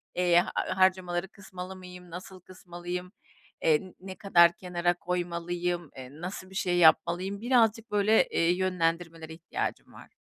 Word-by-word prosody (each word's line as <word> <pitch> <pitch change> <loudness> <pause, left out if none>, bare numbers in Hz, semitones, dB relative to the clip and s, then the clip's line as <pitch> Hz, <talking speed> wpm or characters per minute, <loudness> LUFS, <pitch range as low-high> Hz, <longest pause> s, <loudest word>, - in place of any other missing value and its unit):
Eee, 175 -1 +4
harcamaları 185 -1 +1
kısmalı 190 -2 -9
mıyım, 180 -1 -12
nasıl 185 +2 -9
kısmalıyım? 180 0 -7 0.5
Eee, 160 +4 +2
ne 190 0 -9
kadar 170 -4 +5
kenara 175 -1 0
koymalıyım? 175 -1 -3
Eee, 130 -1 -8
nasıl 185 +1 -6
bir 190 - -14
şey 180 -2 0
yapmalıyım? 175 +4 +3
Birazcık 230 -2 +2
böyle, 210 +1 +3
eee, 170 +1 +2
yönlendirmelere 165 -3 -2
ihtiyacım 165 +1 -5
var. - - -13
180 Hz, 130 wpm, -28 LUFS, 175-185 Hz, 0.5 s, kadar